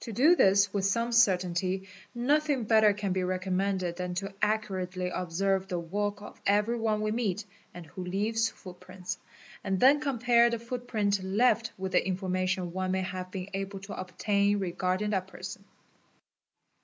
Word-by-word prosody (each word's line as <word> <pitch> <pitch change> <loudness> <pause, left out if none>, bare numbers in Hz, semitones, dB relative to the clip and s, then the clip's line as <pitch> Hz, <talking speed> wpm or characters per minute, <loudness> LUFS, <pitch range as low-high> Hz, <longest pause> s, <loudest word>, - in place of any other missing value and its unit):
To 235 - -6
do 280 - +5
this 195 - +4
with 200 -2 0
some 230 +4 +1
certainty 190 -3 +2 0.3
nothing 285 +1 +1
better 220 -1 +5
can 200 -2 -2
be 190 - 0
recommen 185 +1 -1
ed 175 -1 -3
than 180 -1 -3
to 195 +2 -4
accurately 185 -4 -1
observe 190 +2 0
the 180 -2 -2
walk 205 +4 -3
of - - -12
every 210 +4 +2
one 215 -1 0
we 215 0 0
meet 215 -3 -1 0.3
and 175 -1 -10
who 180 +4 -7
t 195 +3 0
ives 225 0 +1
footprints, 185 0 -8 0.4
and 195 -2 -1
then 275 +6 +6
compare 240 -4 +3
the 235 - -1
footprint 230 -4 -1
left 220 +3 +2
with 190 0 -4
the - - +3
information 185 -1 -1
me 185 0 -2
may 190 0 0
have 185 0 -5
been 185 0 -6
able 195 0 -4
to 200 +1 -8
obtain 200 +2 0
regarding 185 +2 -1
that 190 -2 -1
person. - - -8
195 Hz, 165 wpm, -29 LUFS, 185-220 Hz, 0.4 s, then